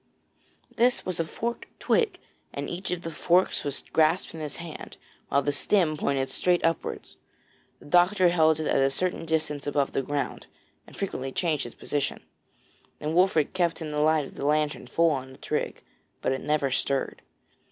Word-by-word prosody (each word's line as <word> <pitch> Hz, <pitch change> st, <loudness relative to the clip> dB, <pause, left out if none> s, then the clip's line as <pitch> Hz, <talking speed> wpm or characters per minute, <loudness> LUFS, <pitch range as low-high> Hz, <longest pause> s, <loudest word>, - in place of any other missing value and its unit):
This 245 Hz, +2 st, +3 dB
was 185 Hz, -2 st, -3 dB
a 165 Hz, -, +1 dB
forked 235 Hz, +8 st, -4 dB
twig, 455 Hz, -3 st, +2 dB, 0.3 s
and -, -, -4 dB
each 180 Hz, +2 st, -5 dB
of 180 Hz, 0 st, -2 dB
the 165 Hz, -, -4 dB
forks 175 Hz, +3 st, +2 dB
was 145 Hz, -1 st, -4 dB
grasped 160 Hz, +3 st, +3 dB
in 165 Hz, -, -7 dB
his 150 Hz, -3 st, -5 dB
hand, 170 Hz, -2 st, -8 dB, 0.3 s
while 140 Hz, -, +3 dB
the 145 Hz, -, +1 dB
stem 155 Hz, +2 st, +2 dB
pointed 135 Hz, -2 st, 0 dB
straight 180 Hz, -2 st, +2 dB
upwards. 165 Hz, 0 st, -2 dB, 0.6 s
The -, -, -17 dB
doctor 180 Hz, +3 st, +4 dB
held 160 Hz, -2 st, +4 dB
it 155 Hz, -, -2 dB
at -, -, +2 dB
a 135 Hz, -, +4 dB
certain 175 Hz, +4 st, -2 dB
distance 150 Hz, -3 st, -1 dB
above 145 Hz, -1 st, +1 dB
the -, -, 0 dB
ground, 145 Hz, +1 st, -3 dB, 0.4 s
and -, -, -14 dB
frequently 135 Hz, -9 st, -3 dB
changed 155 Hz, -3 st, 0 dB
his 120 Hz, -, -9 dB
position, 145 Hz, -2 st, -2 dB, 0.8 s
and 150 Hz, +1 st, -2 dB
Wolfert 175 Hz, -4 st, +3 dB
kept 175 Hz, -3 st, +1 dB
the 160 Hz, -, -5 dB, 0.2 s
light 155 Hz, -1 st, +3 dB
of -, -, -11 dB
the 140 Hz, -, -5 dB
lantern 150 Hz, 0 st, +1 dB
full 165 Hz, 0 st, +3 dB
on 130 Hz, -2 st, -3 dB
the -, -, -14 dB
twig, -, -, -3 dB, 0.4 s
but -, -, +2 dB
it 135 Hz, -, -1 dB
never 150 Hz, -3 st, +1 dB
stirred. 135 Hz, +1 st, -1 dB
155 Hz, 180 wpm, -27 LUFS, 145-175 Hz, 0.8 s, doctor